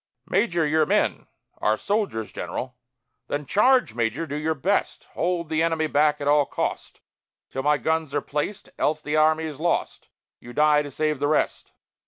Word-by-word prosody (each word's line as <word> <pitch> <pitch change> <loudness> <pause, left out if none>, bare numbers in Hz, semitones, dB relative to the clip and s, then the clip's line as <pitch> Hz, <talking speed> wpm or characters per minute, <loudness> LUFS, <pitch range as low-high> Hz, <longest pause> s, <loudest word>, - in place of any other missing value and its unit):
"Major, 170 -8 +1
your 155 0 +2
men?" - - +1 0.3
"Are 110 +1 +2
soldiers, 200 - -1
general." 125 0 -5 0.5
"Then, 145 0 -3
Charge, 210 - +3
major! 115 +7 -1
Do 145 -2 -5
your 155 +1 -1
best; 190 +9 -1
Hold 175 -1 -1
the 160 0 0
enemy 165 -1 +1
back 150 0 +2
at 145 - -3
all 145 -1 +4
cost, - - -4 0.5
Till 135 - -3
my 150 +2 +3
guns 160 -2 -1
are - - +3
placed; 150 +9 -4
else 150 +1 0
the 150 +1 -2
army 155 +1 +3
is 155 -3 -6
lost. 170 +2 -1 0.3
You 120 - -11
die 150 +1 +4
to 145 - -6
save 150 +1 -1
the 145 - +1
rest!" 155 0 -1
150 Hz, 175 wpm, -24 LUFS, 145-160 Hz, 0.5 s, all